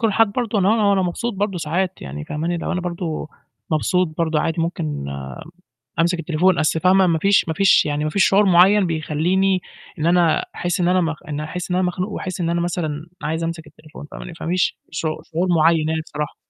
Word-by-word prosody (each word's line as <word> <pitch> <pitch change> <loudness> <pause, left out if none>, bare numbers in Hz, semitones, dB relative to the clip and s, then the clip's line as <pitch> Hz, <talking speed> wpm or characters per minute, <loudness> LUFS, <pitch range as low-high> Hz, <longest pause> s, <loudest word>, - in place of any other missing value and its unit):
كل 230 - +3
الحالات 215 -1 +2
برضه، 230 -4 -1
اللي 190 - +3
هو 215 -2 +3
وأنا 195 -1 +3
مبسوط 200 +6 -2
برضه 195 -2 -2
ساعات 175 +4 -2
يعني 75 +2 -6
فاهماني، 160 - -2
اللي 170 - -4
هو - - -1
أنا 180 - -1
برضه 170 -3 -4 0.4
مبسوط 180 +3 +1
برضه 160 -2 +1
عادي 165 +1 -1
مُمكن 170 0 -2 0.2
آمم 70 -1 -6 0.7
أمسِك 170 +1 +2
التليفون، 170 +3 +2
أصل 155 +1 +1
فاهمة، 185 +2 +4
ما 165 -2 +1
فيش 200 +3 +3
ما 160 - -1
فيش 195 +2 +4
يعني 150 0 -1
ما 155 - 0
فيش 190 +5 +3
شعور 200 +2 +4
مُعيّن 190 +2 +5
بيخلّيني 170 +4 +1 0.4
إن 155 - -1
أنا 170 -1 +3
أحسّ 175 0 -2
إن 175 - +2
أنا 185 +1 +3
مخ 165 -2 -1
إني 150 0 -3
أحسّ 175 +4 -5
إن - - +1
أنا 185 - +2
مخنوق 180 +3 -3
وأحسّ 190 -3 -5
إن 165 - 0
أنا 170 0 0
مثلًا 165 -3 -3 0.2
عايز 160 +2 -2
أمسِك 165 -1 -4
التليفون 155 0 -13
فاهماني، 175 - -8
فمِش 175 +2 -1
شعو 155 -1 -3
شعور 170 +4 -2
مُعيّن 160 0 +3
يعني 160 0 -1
بصراحة. 150 -2 -5
170 Hz, 215 wpm, -21 LUFS, 155-185 Hz, 0.7 s, مُعيّن